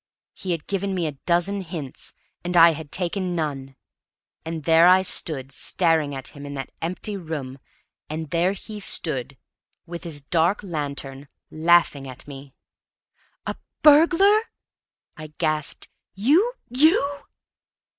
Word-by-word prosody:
He 190 - -8
had 165 -3 -2
given 195 0 -2
me 175 -2 -1
a 155 - -1 0.2
dozen 180 +3 +2
hints, 160 -7 -6 0.3
and 175 0 -1
I 170 0 +9
had 155 -2 -8
taken 180 0 -2
none. 135 -4 -4 0.7
And 160 -1 -5
there 165 +2 +6
I 185 +1 +6
stood 140 -7 -2
staring 160 -1 +1
at 135 -1 -6
him, 140 - -12
in 145 0 -7
that 135 - -6
empty 185 +5 -3
room; 150 -7 -6 0.5
and 155 -1 -5
there 175 +3 +2
he 210 +2 -8
stood 140 -8 -1 0.5
with 170 0 -7
his 160 -4 -3
dark 170 +8 +1
lantern, 140 -5 -5 0.2
laughing 160 -4 +3
at 130 +1 -11
me. 140 -1 -11 0.9
"A - - -3 0.3
burglar!" 340 +8 +6 0.8
I 155 0 -10
gasped. 155 -2 -1 0.3
"You 310 - +3
you!" 285 - +2
165 Hz, 135 wpm, -23 LUFS, 145-190 Hz, 0.9 s, I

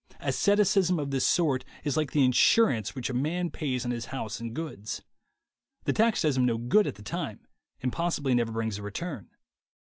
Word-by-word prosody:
Asceticism 195 -3 +3
of 145 -2 -3
this 135 -1 +2
sort 140 -7 +2 0.2
is 145 -2 -1
like 155 -3 0
the 145 -3 +4
insurance 130 - +3
which 130 0 -3
a. - - -5
man 165 +7 -1
pays 130 -5 -2
on 120 - -1
his 120 -1 -3
house 110 -6 -5
and 115 0 -6
goods. 150 -10 -5 0.8
The - - +1
tax 225 -2 +2
does 150 -4 +2
him 125 - +3
no 115 -2 +1
good 125 - +3
at - - -3
the 105 - -13
time, - - -4 0.4
and 125 - 0
possibly 165 -6 0
never 120 -2 +1
brings 110 -2 -2
a - - -8
return. 105 - -6
135 Hz, 190 wpm, -28 LUFS, 115-165 Hz, 0.8 s, the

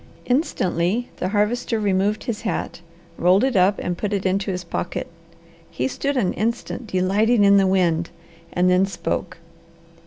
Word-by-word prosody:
Instantly 230 - 0
the 180 - -2
Harvester 220 +3 0
removed 205 +1 0
his 230 -2 -4
hat, 220 -5 -3 0.4
rolled 185 +5 +4
it 265 -3 +1
up, 195 +2 +4
and 175 -1 -3
put 210 -1 -2
it 200 -1 -2
into 195 +1 0
his 180 -1 -3
pocket. 170 0 -4 0.6
He 125 - -2
stood 280 - -2
an 195 -7 +1
instant 235 +2 -3
delighting 205 +4 +2
in 200 0 +6
the 195 -1 +4
wind 175 -3 +1 0.4
and 180 +1 +2
then 180 +1 +4
spoke. 190 -3 -4
195 Hz, 155 wpm, -22 LUFS, 180-220 Hz, 0.6 s, in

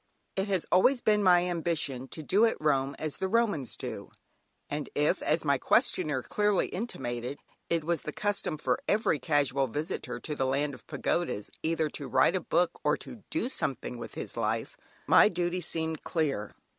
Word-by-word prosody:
It 195 +1 0
has 190 -4 0
always 250 +8 +5
been 210 -2 +3
my 180 -2 +5
ambition 160 -7 -1
to 155 - -8
do 195 +8 +3
at 225 - 0
Rome 140 -2 +1
as 155 -2 -3
the 190 - -1
Romans 205 - 0
do, - - -6 0.6
and 145 0 -4
if, 150 +1 +2
as 160 +1 +1
my 140 -2 +3
questioner 155 - +2
clearly 210 -2 +1
intimated, 125 - -4 0.3
it 165 -2 +1
was 170 -1 0
the - - -5
custom 205 -6 -1
for 155 - 0
every 205 -8 +2
casual 140 -1 +1
visitor 125 -2 -4
to 150 - -5
the 135 -3 0
Land 140 +2 0
of - - -13
Pagodas 170 -12 -2
either 160 -1 +1
to 140 - -5
write - - +4
a 185 - 0
book 175 +1 0
or 150 0 +2
to 230 - -9
"do 315 -6 -1
something 135 - -3
with - - -8
his - - -4
life," - - -1 0.3
my - - +7
duty 180 -1 -1
seemed 160 -2 -2
clear. 140 - -1
160 Hz, 180 wpm, -29 LUFS, 140-185 Hz, 0.6 s, my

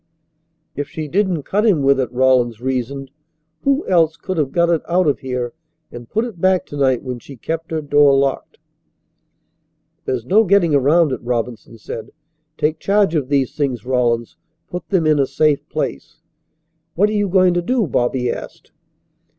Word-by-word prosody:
"If 145 0 -4
she 160 -2 -5
didn't 185 -2 0
cut 205 +8 0
him 190 -11 +3
with 135 0 +3
it," 125 -3 -1
Rawlins 125 -3 +2
reasoned, 130 +2 -3 0.5
"who 275 +2 +1
else 165 -3 +2
could 185 +4 -5
have 145 -4 0
got 170 -1 +2
it 165 - +1
out 180 +1 +2
of 145 - +1
here 125 -2 -4 0.4
and 120 -1 -10
put 220 +2 0
it 205 -9 -9
back 185 -1 +2
to - - -10
night 130 -3 +1
when 125 -2 -5
she 140 - -12
kept 165 +6 -4
her 160 -1 -3
door 145 -1 +4
locked?" 135 -1 -1 1.5
"There's 125 -3 -2
no 210 - +4
getting 190 -5 +3
around 145 +3 +3
it," 130 - -3
Robinson 120 -1 -4
said. 110 +1 -8 0.5
"Take 155 +1 0
charge 200 -3 +2
of 145 -5 -1
these 140 -2 0
things, 130 -7 -2
Rawlins. 120 -2 0 0.3
Put 180 - -6
them 180 -5 +1
in 155 -1 +3
a 135 - +2
safe 150 0 +1
place." - - -4 0.8
"What 200 +5 +3
are - - -3
you 205 -1 +1
going 185 -1 +4
to 175 - 0
do?" 240 +4 0
Bobby 125 -2 0
asked. - - -9
145 Hz, 175 wpm, -19 LUFS, 130-175 Hz, 1.5 s, door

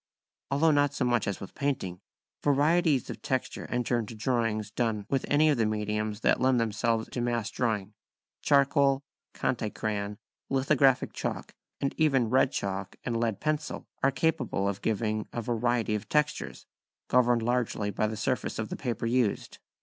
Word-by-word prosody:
Although 150 +4 +3
not 145 -1 +2
so 130 - 0
much 120 -3 +1
as 100 - -2
with 95 - -9
painting, 105 -11 -2 0.4
varieties 150 0 +3
of - - -9
texture 130 -1 -2
enter 125 0 0
into 115 0 -5
drawings 110 -2 -1
done 110 -3 -1
with 135 -2 0
any 150 +2 +4
of 145 -5 +2
the 110 - +3
mediums 105 0 -2
that - - +3
lend 130 -1 +4
themselves 115 0 0
to 125 - -2
mass 120 -2 -1
drawing; 110 -4 -1 0.5
charcoal, 140 -1 +3 0.3
conté 110 -4 -1
crayon, 105 -1 -3 0.3
lithographic 135 -1 +3
chalk, - - -4 0.3
and 140 - -1
even 135 -7 +3
red 130 +1 +4
chalk 95 -1 -3
and 120 - -2
lead 115 -4 0
pencil 155 -1 -2 0.2
are 135 - +4
capable 135 -8 0
of 100 0 -2
giving 110 -1 -1
a 120 - -3
variety 120 -1 0
of 105 - -3
textures, 150 -1 -1 0.4
governed 120 -2 +3
largely 120 -4 0
by 110 - 0
the 110 0 -4
surface 125 0 -1
of 110 -1 -3
the - - -3
paper 120 -3 -3
used. 120 -2 0
120 Hz, 165 wpm, -29 LUFS, 110-135 Hz, 0.5 s, any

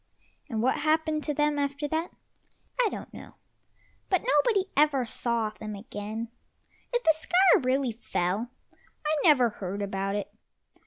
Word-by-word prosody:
And 225 -3 -1
what 260 - +2
happened 310 0 +1
to 300 - 0
them 295 0 +1
after 285 +1 -1
that 320 +3 -1 0.7
I 445 - +3
don't - - -8
know, - - -11 0.7
but 370 - +2
nobody 460 -5 +3
ever 280 -3 +3
saw 230 -1 -1
them 215 -1 -7
again; 215 +2 -6 0.6
if 485 0 0
the 320 - +5
sky 375 +6 +4
really 260 -1 +1
fell, 215 0 -2 0.6
I 305 +1 +2
never 265 -8 +5
heard 200 -1 -5
about 195 0 -2
it. 205 0 -4
265 Hz, 145 wpm, -28 LUFS, 215-315 Hz, 0.7 s, the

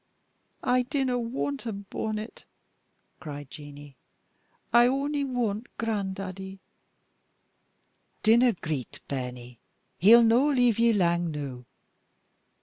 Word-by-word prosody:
"I 250 0 +3
dinna 255 -1 -1
want 250 +2 -3
a - - -1
bonnet," 215 +2 -5 0.7
cried 145 -3 -8
Jeanie; 145 -2 -11 0.8
"I 240 0 +7
on'y 280 +2 0
want 240 -4 -2
gran'daddie." 195 -3 -4 1.7
"Dinna 235 +2 +5
greet, 155 - -5
bairnie; 125 -3 -6 0.4
he'll 230 +5 +8
no 235 +5 +4
leave 245 -5 +3
ye 235 0 +5
lang 175 -4 +1
noo." 140 -5 -6
215 Hz, 95 wpm, -27 LUFS, 155-245 Hz, 1.7 s, he'll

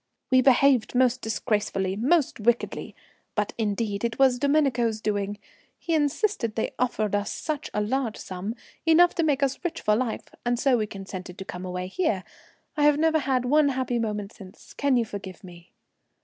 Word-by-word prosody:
'We 260 0 +6
behaved 255 -3 +4
most 255 0 +3
disgracefully, 205 -3 -1
most 275 +7 +1
wickedly, 235 +2 0 0.4
but 210 -1 -1
indeed 210 -1 -1
it 230 -1 -1
was 260 -2 +4
Domenico's 265 -6 +2
doing. 205 -1 -2 0.4
He 335 - -3
insisted 295 - 0
they 220 - -2
offered 220 -5 0
us 205 0 0
such 305 -3 -4
a 210 - -1
large 230 +1 -1
sum, 190 +5 -5 0.3
enough 335 +2 +5
to 335 - 0
make 285 -3 +1
us 275 +4 -1
rich 350 - -2
for 210 - +2
life, 235 0 -3
and 240 0 +1
so 265 +1 +3
we 215 -3 0
consented 190 -2 -8
to 190 - -7
come 180 0 -7
away 180 0 -4
here. 190 - -1 0.5
I 300 - -1
have 295 -1 +5
never 320 0 +3
had 260 -3 0
one 295 +3 +4
happy 255 -2 -1
moment 210 -2 -3
since. 190 -4 -14
Can 280 -3 +2
you 235 - +1
forgive 200 -3 -8
me?' 175 -1 -13
235 Hz, 175 wpm, -26 LUFS, 205-275 Hz, 0.5 s, We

